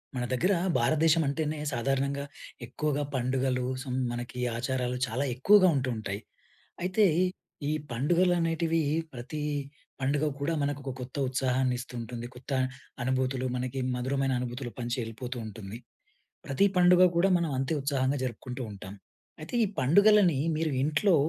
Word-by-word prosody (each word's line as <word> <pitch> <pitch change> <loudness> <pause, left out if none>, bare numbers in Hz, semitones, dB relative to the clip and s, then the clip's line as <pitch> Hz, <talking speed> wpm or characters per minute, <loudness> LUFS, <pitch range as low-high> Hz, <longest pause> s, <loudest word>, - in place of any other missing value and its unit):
మన 125 - -1
దగ్గర 180 +11 +2 0.2
భారతదేశం 155 +6 +3
అంటేనే 155 +2 -1
సాధారణంగా 135 +3 0 0.4
ఎక్కువగా 145 +3 -1
పండుగలు 130 0 0 0.2
సం 130 -2 -4 0.2
మనకి 120 +1 -5 0.2
ఆచారాలు 125 0 -1
చాలా 125 +5 -1
ఎక్కువగా 185 +10 +6
ఉంటూ 135 -1 0
ఉంటాయి. 105 -1 -4 0.6
అయితే 200 +4 +3 0.6
ఈ - - +1 0.2
పండుగలు 170 +9 +2
అనేటివి 165 0 +1 0.3
ప్రతి 130 +5 -6 0.6
పండుగ 140 +3 +1 0.2
కూడా 145 +4 0
మనకు 145 0 -1
ఒక 135 - -3
కొత్త 125 0 -8
ఉత్సాహాన్ని 130 0 +1
ఇస్తూ 125 - -8
ఉంటుంది. 120 +1 -6
కొత్త 125 +3 -10 0.5
అనుభూతులు 130 0 0
మనకి 125 +1 -3 0.2
మధురమైన 135 +2 0
అనుభూతులు 125 0 -4
పంచి 120 0 -2
వెళ్ళిపోతూ 120 +3 -5
ఉంటుంది. 105 0 -8 0.7
ప్రతి 140 +9 +3
పండుగ 180 0 +6
కూడా 185 +3 +4
మనం 170 -3 -1
అంతే 135 +4 0
ఉత్సాహంగా 135 0 0
జరుపుకుంటూ 125 +1 -5
ఉంటాం. 100 0 -9 0.5
అయితే 155 - -9
ఈ - - -1
పండుగలని 180 +3 +5 0.2
మీరు 155 0 0
ఇంట్లో 155 +6 +3
135 Hz, 135 wpm, -29 LUFS, 125-155 Hz, 0.7 s, ఎక్కువగా